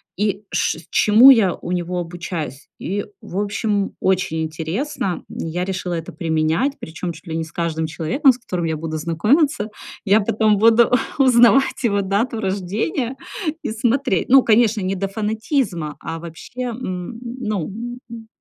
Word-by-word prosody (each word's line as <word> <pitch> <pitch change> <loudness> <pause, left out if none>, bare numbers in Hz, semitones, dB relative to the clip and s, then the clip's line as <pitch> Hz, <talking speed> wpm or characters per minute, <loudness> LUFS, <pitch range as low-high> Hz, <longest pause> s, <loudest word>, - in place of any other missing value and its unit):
и 205 0 -1
ш - - 0
чему 220 +5 +7
я 205 -9 +4
у 175 - -7
него 180 0 -2
обучаюсь. 170 -5 -6
И, 200 +4 -3 0.2
в 180 - -7
общем, 205 0 -1
очень 185 -4 0
интересно, 170 - -3
я 175 +2 -3
решила 180 -2 -3
это 165 -1 -6
применять, 160 - 0
причём 165 +2 -5
чуть 165 +2 -13
ли 160 - -4
не 165 - -1
с 160 - -10
каждым 165 -1 -2
человеком, 165 - +2
с 250 - -5
которым 180 -8 -4
я 160 -1 -1
буду 160 0 -5
знакомиться. 210 - +1 0.3
Я 205 +2 +4
потом 215 0 +2
буду 230 +2 +5 0.3
узнавать 260 0 +4
его 205 -4 +2
дату 205 +5 -1
рождения 215 - -2 0.5
и - - -2
смотреть. 240 - 0
Ну, 270 +1 +8
конечно, 225 -1 +3
не 190 +1 -1
до 195 +1 -2
фанатизма, 210 - -2
а 165 - -5
вообще, 170 +9 -9
м, 230 -4 -4
ну, 235 -7 -3 0.4
м, 225 -1 -9
200 Hz, 155 wpm, -20 LUFS, 170-230 Hz, 0.5 s, Ну